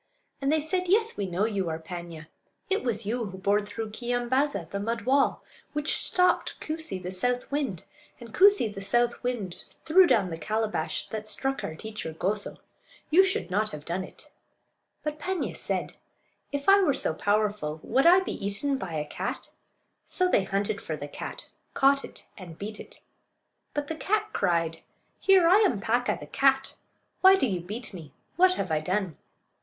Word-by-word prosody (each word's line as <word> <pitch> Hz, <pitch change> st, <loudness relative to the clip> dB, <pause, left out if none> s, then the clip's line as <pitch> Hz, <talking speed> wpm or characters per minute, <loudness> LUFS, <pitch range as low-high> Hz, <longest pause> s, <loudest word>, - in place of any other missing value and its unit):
And 275 Hz, +1 st, +1 dB
they 315 Hz, -, +3 dB
said: 360 Hz, +4 st, -1 dB
"Yes, 440 Hz, +5 st, +3 dB
we 200 Hz, -, -2 dB
know 185 Hz, +3 st, 0 dB
you 200 Hz, -6 st, -1 dB
are 160 Hz, -, -2 dB
Paanya; 170 Hz, -1 st, -8 dB, 0.5 s
it 390 Hz, -, +1 dB
was 230 Hz, -4 st, -1 dB
you 235 Hz, +3 st, -1 dB
who 190 Hz, -2 st, -7 dB
bored 200 Hz, +2 st, +1 dB
through 220 Hz, +1 st, -5 dB
Keeyambaaza, 245 Hz, -, -1 dB
the 200 Hz, -, -2 dB
mud 230 Hz, +3 st, -2 dB
wall; 270 Hz, +2 st, +2 dB, 0.3 s
which 295 Hz, +1 st, 0 dB
stopped 365 Hz, 0 st, +1 dB
Koosee, 315 Hz, -9 st, -4 dB
the 180 Hz, 0 st, -6 dB
south 245 Hz, +8 st, -1 dB
wind; 275 Hz, -, -2 dB, 0.4 s
and 235 Hz, -2 st, -11 dB
Koosee, 400 Hz, -, +6 dB
the 195 Hz, -, -7 dB
south 240 Hz, +4 st, +1 dB
wind, 230 Hz, -8 st, -3 dB, 0.2 s
threw 360 Hz, +3 st, +6 dB
down 195 Hz, -, +2 dB
the 165 Hz, -, -5 dB
calabash 215 Hz, -1 st, -2 dB
that 215 Hz, -1 st, -5 dB
struck 270 Hz, +6 st, -1 dB
our 160 Hz, -, -4 dB
teacher 215 Hz, -3 st, -6 dB
Goso. 200 Hz, +6 st, -2 dB, 0.5 s
You 365 Hz, +5 st, +7 dB
should 380 Hz, -, -1 dB
not 210 Hz, +3 st, +2 dB
have 150 Hz, -1 st, -8 dB
done 180 Hz, +3 st, -2 dB
it." -, -, -13 dB, 0.7 s
But 300 Hz, 0 st, -3 dB
Paanya 370 Hz, +3 st, -2 dB
said, -, -, -2 dB, 0.5 s
"If 285 Hz, 0 st, -4 dB
I 395 Hz, +1 st, +7 dB
were 295 Hz, -8 st, +3 dB
so 215 Hz, -, +1 dB
powerful 205 Hz, -4 st, 0 dB
would 270 Hz, +6 st, +3 dB
I 365 Hz, +2 st, +7 dB
be 375 Hz, -, -5 dB
eaten 265 Hz, +8 st, -1 dB
by 180 Hz, -8 st, -5 dB
a 150 Hz, -1 st, -2 dB
cat?" -, -, -5 dB, 0.6 s
So 365 Hz, -, +1 dB
they 200 Hz, -, +2 dB
hunted 200 Hz, +1 st, -1 dB
for 155 Hz, -, -4 dB
the 145 Hz, -1 st, -7 dB
cat, -, -, -7 dB, 0.3 s
caught 275 Hz, 0 st, +4 dB
it, -, -, -11 dB
and 170 Hz, -4 st, -10 dB
beat 210 Hz, +1 st, -6 dB
it. -, -, -12 dB, 0.7 s
But 290 Hz, 0 st, -2 dB
the 320 Hz, -, -4 dB
cat 425 Hz, +4 st, 0 dB
cried: 165 Hz, -3 st, 0 dB, 0.4 s
"Here! 380 Hz, -3 st, +5 dB
I 365 Hz, +4 st, +7 dB
am 390 Hz, -, +3 dB
Paa'ka, 240 Hz, +4 st, 0 dB
the -, -, -8 dB
cat. 270 Hz, 0 st, +2 dB, 0.5 s
Why 380 Hz, 0 st, +8 dB
do 385 Hz, -, +1 dB
you 190 Hz, -7 st, -1 dB
beat 210 Hz, +7 st, -7 dB
me? 160 Hz, -5 st, -10 dB, 0.2 s
What 370 Hz, +1 st, +5 dB
have 180 Hz, -, -3 dB
I 155 Hz, -, +2 dB
done?" 180 Hz, +1 st, -2 dB
220 Hz, 180 wpm, -27 LUFS, 190-290 Hz, 0.7 s, Why